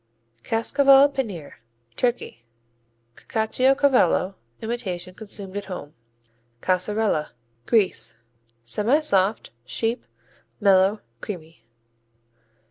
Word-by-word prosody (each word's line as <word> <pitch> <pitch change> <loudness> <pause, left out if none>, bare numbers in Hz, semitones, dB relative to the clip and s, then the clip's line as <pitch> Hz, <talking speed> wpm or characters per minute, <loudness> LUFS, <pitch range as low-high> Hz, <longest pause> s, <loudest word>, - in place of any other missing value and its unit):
Cascaval 275 +4 +4
Penir 200 - -5 0.4
Turkey 240 - -2 0.7
Cacciocavallo 250 - +2 0.3
imitation 190 -6 -4
consumed 200 -1 -7
at 205 - -4
home. 165 -6 -8 0.7
Caseralla 185 - 0 0.3
Greece 185 - +2 0.5
Semisoft; 210 - +2
sheep; 225 - -2 0.6
mellow; 195 0 +4 0.2
creamy. 165 - -8
205 Hz, 65 wpm, -23 LUFS, 185-240 Hz, 0.7 s, Cascaval